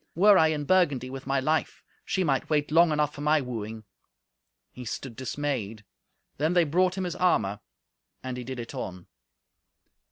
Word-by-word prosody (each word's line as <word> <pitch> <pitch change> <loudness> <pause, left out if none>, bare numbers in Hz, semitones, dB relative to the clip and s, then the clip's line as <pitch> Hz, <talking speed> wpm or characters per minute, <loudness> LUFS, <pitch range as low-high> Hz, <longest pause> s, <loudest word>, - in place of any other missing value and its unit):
Were 200 +4 +6
I 160 -4 +6
in 155 -2 -1
Burgundy 145 -8 +2
with 135 0 -8
my 135 0 +1
life, 155 +4 -1 0.2
she 190 - -1
might 135 -6 0
wait 150 -1 +1
long 170 +1 +5
enough 150 -1 +1
for 145 - -9
my 150 +1 +3
wooing." 115 -4 -5 0.9
He 125 - -9
stood 120 +1 -6
dismayed. 130 -5 -3 0.5
Then 155 +4 +1
they 175 -1 +5
brought 180 +4 +1
him 190 - -1
his 180 -1 -3
armour, 110 - +1 0.6
and 130 -1 -4
he 125 - -5
did 130 +1 -6
it 115 - -7
on. 90 -3 -6
145 Hz, 170 wpm, -27 LUFS, 125-160 Hz, 0.9 s, Were